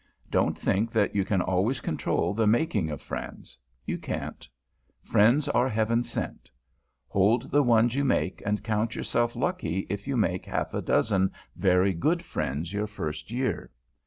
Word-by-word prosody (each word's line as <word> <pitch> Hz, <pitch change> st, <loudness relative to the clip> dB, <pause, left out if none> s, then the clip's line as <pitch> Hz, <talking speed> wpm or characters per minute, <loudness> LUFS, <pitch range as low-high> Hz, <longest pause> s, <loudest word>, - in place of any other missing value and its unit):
Don't -, -, +2 dB
think 110 Hz, +4 st, 0 dB
that 110 Hz, -3 st, +2 dB
you 100 Hz, -, +2 dB
can 95 Hz, -2 st, +1 dB
always 100 Hz, +8 st, +1 dB
control 80 Hz, -1 st, -1 dB
the 110 Hz, +1 st, +1 dB
making 110 Hz, -, +2 dB
of 75 Hz, -4 st, -6 dB
friends; -, -, -7 dB, 0.3 s
you -, -, -3 dB
can't. -, -, -5 dB, 0.5 s
Friends 120 Hz, +8 st, +4 dB
are 120 Hz, +2 st, +2 dB
Heaven 115 Hz, +2 st, +1 dB
sent. -, -, -5 dB, 0.6 s
Hold 100 Hz, -, +2 dB
the 145 Hz, -, +5 dB
ones 120 Hz, -2 st, +4 dB
you 140 Hz, +2 st, +1 dB
make, 125 Hz, -8 st, 0 dB
and 105 Hz, +1 st, -1 dB
count 110 Hz, 0 st, -1 dB
yourself 120 Hz, 0 st, 0 dB
lucky 115 Hz, -, -1 dB
if 100 Hz, +2 st, -4 dB
you 135 Hz, -2 st, 0 dB
make 95 Hz, -5 st, 0 dB
half -, -, -2 dB
a -, -, -1 dB
dozen 95 Hz, -3 st, +2 dB, 0.2 s
very 95 Hz, 0 st, +3 dB
good 160 Hz, -, 0 dB
friends 75 Hz, +4 st, -3 dB
your 105 Hz, +1 st, -1 dB
first 90 Hz, -7 st, -5 dB
year. 125 Hz, +2 st, -2 dB
105 Hz, 160 wpm, -27 LUFS, 95-120 Hz, 0.6 s, the